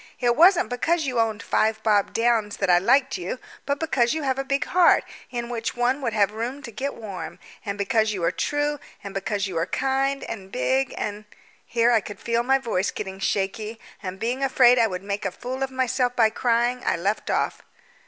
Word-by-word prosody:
It 240 -2 +2
wasn't 350 0 +5
because 320 +6 +1
you 250 -3 -1
owned 225 -1 0
Five 220 0 +1
Bob 210 -2 +2
Downs 230 -3 +1
that 195 -2 +1
I 175 - +6
liked 265 +6 +2
you, 180 +8 -4 0.3
but 280 0 0
because 265 -6 +1
you 315 - -3
have 265 -1 0
a - - 0
big 275 +2 0
heart 360 -1 +4 0.3
in 240 -1 -4
which 235 -1 -4
one 250 +3 +1
would 235 -4 -1
have 205 -2 +3
room 240 +6 -4
to 235 - -7
get 270 +6 -4
warm, 200 -5 -7 0.3
and 200 -2 -4
because 215 +2 +1
you 190 -4 -4
are 170 - +3
true, 290 0 -1 0.2
and 200 -1 -7
because 200 +1 -2
you 180 -4 -2
are 165 - -1
kind 270 +4 0
and 195 -4 -7
big 260 +2 0
and 210 0 -4 0.2
" - - -31
Here 235 0 +3
I 230 -2 +4
could 200 0 -9
feel 235 0 0
my 265 +3 +3
voice 220 -7 -1
getting 190 -2 -6
shaky, 210 +3 -2 0.2
and 185 -2 -5
being 245 +5 -1
afraid 250 -2 +5
I 230 - +4
would 185 -2 -5
make 200 +1 -3
a - - 0
fool 260 +2 -6
of 270 - 0
myself 255 -1 0
by 220 -2 +4
crying, 240 +2 +1
I - - +1
left 200 +5 -2
off. - - 0
235 Hz, 215 wpm, -24 LUFS, 205-265 Hz, 0.3 s, I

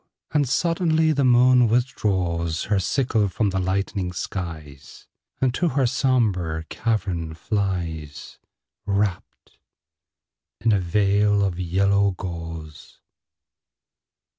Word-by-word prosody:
And 145 -4 +1
suddenly 160 0 +2
the 140 -2 +1
moon 125 0 +5
withdraws 95 -9 0
Her 100 -1 +1
sickle 110 +1 +1
from 100 +2 -1
the 95 - -1
lightening 95 0 -2
skies, 80 -7 -7 0.3
And 130 -2 +1
to 175 +6 0
her 135 -1 +1
sombre 110 - 0
cavern 90 -8 -2
flies, 85 -7 -4 0.5
Wrapped 100 -2 -3 1.0
in 115 +2 +2
a 100 - +3
veil 100 +3 +2
of 95 -3 -2
yellow 100 +3 +2
gauze. 80 -4 -8
100 Hz, 100 wpm, -23 LUFS, 85-120 Hz, 1.0 s, moon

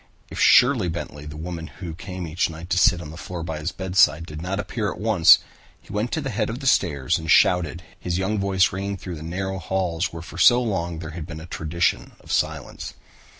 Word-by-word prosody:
If - - -6
Sherley 125 -8 +5
Bentley, 75 -3 -6
the 75 0 -8
woman 80 0 -6
who 85 +3 -8
came 90 +2 -7
each 80 +2 0
night 85 +2 -9
to 90 - +2
sit 90 -4 +4
on 75 - -9
the 80 - -10
floor 90 -1 -6
by 80 -2 -4
his 80 +3 -3
bedside, 95 -3 +2
did 75 -1 -8
not 95 +3 -3
appear 105 0 -2
at - - -8
once, 105 -6 +6 0.4
he - - -13
went 105 +4 -1
to 160 - 0
the 135 -2 -3
head 105 - -1
of 115 +3 -4
the 135 - -8
stairs 75 - +2
and 80 0 -7
shouted, 90 -1 +3 0.2
his 90 -1 -2
young 100 +3 -1
voice 95 -2 +2
ringing 100 +1 -3
through 90 -2 -7
the - - -10
narrow 95 +4 -4
halls 90 -1 -1
where 85 0 -8
for - - -9
so 120 0 +7
long 90 -8 -2
there 80 0 -7
had 80 0 -7
been 80 -3 -7
a 80 - -9
tradition 85 0 -1
of - - -11
silence. - - -2
90 Hz, 230 wpm, -23 LUFS, 80-95 Hz, 0.4 s, so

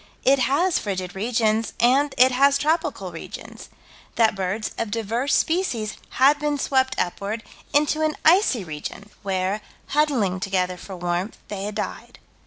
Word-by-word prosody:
It 275 +1 +4
has 325 +8 +2
frigid 185 -3 -4
regions 220 +1 0
and 270 +4 +3
it 255 +1 +6
has 275 +2 +4
tropical 315 +4 -1
regions - - -9 0.5
that 225 -2 +4
birds 195 +2 -2
of 230 - -1
diverse 230 +5 0
species 255 - 0 0.2
had 280 +3 +5
been 295 -1 0
swept 265 -1 +1
upward, 200 +5 -2 0.3
into 300 +1 +2
an 310 -1 +1
icy 320 - +4
region, 165 +6 -7
where, 190 +1 -1 0.3
huddling 265 -11 +1
together 185 -2 -1
for 190 +1 -9
warmth, 175 +3 -2
they 200 -1 -4
had 210 0 -5
died. 210 - -5
225 Hz, 145 wpm, -23 LUFS, 195-280 Hz, 0.5 s, it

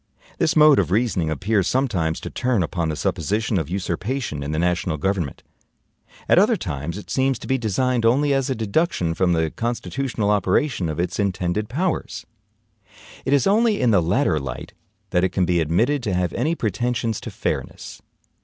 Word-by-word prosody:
This 165 -1 +2
mode 150 -2 +7
of 90 -6 +1
reasoning 95 -5 +1
appears 95 +6 0
sometimes 95 -12 0
to - - -6
turn 120 -6 0
upon 85 0 -2
the 80 - -2
supposition 105 +7 -1
of 80 -2 -4
usurpation 95 - -3
in 70 - -4
the 80 - -2
national 85 -1 0
government; 90 -3 -2 0.8
at - - +5
other - - +4
times 75 +6 -4
it 105 - -9
seems 135 -1 +1
to - - -10
be 130 0 0
designed 120 +2 0
only 140 +5 +3
as 135 -1 0
a 130 - 0
deduction 110 - 0
from 90 +1 +1
the 80 -2 0
constitutional 120 -2 -2
operation 100 - +1
of 75 - -4
its 90 +3 -2
intended 100 +1 -1
powers. 170 +7 -2 1.0
It 135 - -1
is 140 -3 +3
only 215 +1 +3
in 125 -2 +3
the 100 -4 +4
latter 85 - +1
light 70 -3 -7 0.4
that 90 - +2
it 95 - +3
can 95 0 0
be 85 0 +1
admitted 115 - +1
to 105 -6 -1
have 90 -2 0
any 165 +2 0
pretensions 115 - -1
to - - -6
fairness. - - -5
100 Hz, 180 wpm, -22 LUFS, 85-130 Hz, 1.0 s, mode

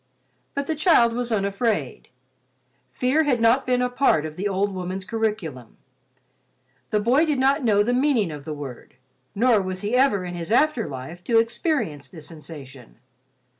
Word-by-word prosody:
But 280 0 -1
the 320 - -2
child 305 -8 +4
was 245 0 -3
unafraid. 200 - -1 0.8
Fear 260 +5 +1
had 260 -5 +2
not 230 +4 +3
been 250 0 +2
a - - +2
part 245 - +2
of 155 -1 -6
the 195 +4 -2
old 200 +1 -1
woman's 185 +1 -5
curriculum. 210 - -3 1.1
The 210 - +1
boy 245 +8 +3
did 305 -4 0
not 270 +2 +2
know 205 -3 +3
the 245 +3 0
meaning 250 - +2
of 145 -2 -8
the 155 - -6
word, 140 -4 -9 0.4
nor 230 0 +4
was 185 0 -4
he 210 +3 -3
ever 250 -8 +3
in 175 - -5
his 175 +2 -5
after 255 -2 +2
life 135 +6 -8
to 230 - +3
experience 230 - -1
the 165 - -11
sensation. 145 -6 -11
210 Hz, 170 wpm, -23 LUFS, 170-250 Hz, 1.1 s, child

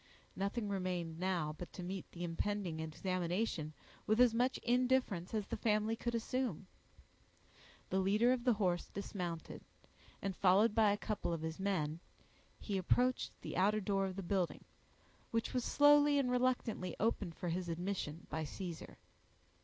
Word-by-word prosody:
Nothing 205 +3 -1
remained 180 -4 -2
now, 175 -5 0
but 175 - -7
to 180 - -6
meet 185 +1 -5
the 175 - -6
impending 175 0 -2
examination 175 +1 -2 0.4
with 215 +2 +3
as 245 -2 +6
much 250 +3 +2
indifference 245 -7 +2
as 215 -2 -1
the - - -4
family 215 0 +1
could 235 +1 -2
assume. 230 -5 -2 1.3
The 190 - +2
leader 210 +6 +4
of 250 -2 -2
the 250 -1 +4
horse 185 -5 0
dismounted, 180 -4 -5 0.6
and, 195 -2 -3
followed 200 +5 +4
by 215 -2 +5
a 205 - +1
couple 210 -4 -2
of 165 -2 -2
his 160 +1 -4
men, 170 -5 -1 0.6
he 200 -3 -2
approached 250 +7 +1
the - - -5
outer 205 +4 +3
door 195 -1 0
of 185 - -5
the 195 - -4
building, 180 -1 -1 0.7
which 230 0 -1
was 250 -1 0
slowly 290 +1 +6
and 260 -3 +2
reluctantly 245 -7 0
opened 205 -6 0
for 180 - -3
his 175 +1 -2
admission 170 -2 -3
by 160 - -3
Caesar. 170 +2 -6
195 Hz, 155 wpm, -36 LUFS, 175-230 Hz, 1.3 s, as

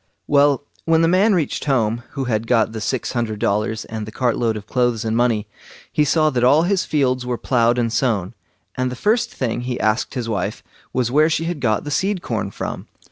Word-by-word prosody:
Well, 145 -1 +3 0.2
when 165 0 +3
the - - +4
man 190 +4 +4
reached 160 -6 -1
home, 120 -5 +1
who 135 - -2
had 115 -3 -1
got 115 -3 +2
the 110 -1 -6
six 125 +4 -2
hundred 115 -3 -2
dollars 105 +2 -1
and 110 -1 -6
the - - -7
cart 120 +1 0
load 115 -2 0
of 105 - -9
clothes 120 -3 0
and 110 0 0
money, 115 -3 +1 0.5
he 150 - +2
saw 155 +1 +2
that 125 -3 0
all 145 +6 +5
his 190 +1 +1
fields 130 -4 +1
were 125 -1 -2
ploughed 120 -1 +2
and 115 -2 0
sown, 110 -7 0 0.4
and 130 0 0
the - - -5
first 215 - +1
thing 120 -2 -2
he 125 0 -3
asked 110 +5 0
his 120 -3 -3
wife 100 -5 -3 0.3
was, 125 -2 0
where 155 +4 +4
she 160 0 0
had 165 -2 -3
got 110 -5 +1
the 145 - -5
seed 190 +5 0
corn 105 -4 -2
from. - - -6
125 Hz, 220 wpm, -20 LUFS, 110-145 Hz, 0.5 s, all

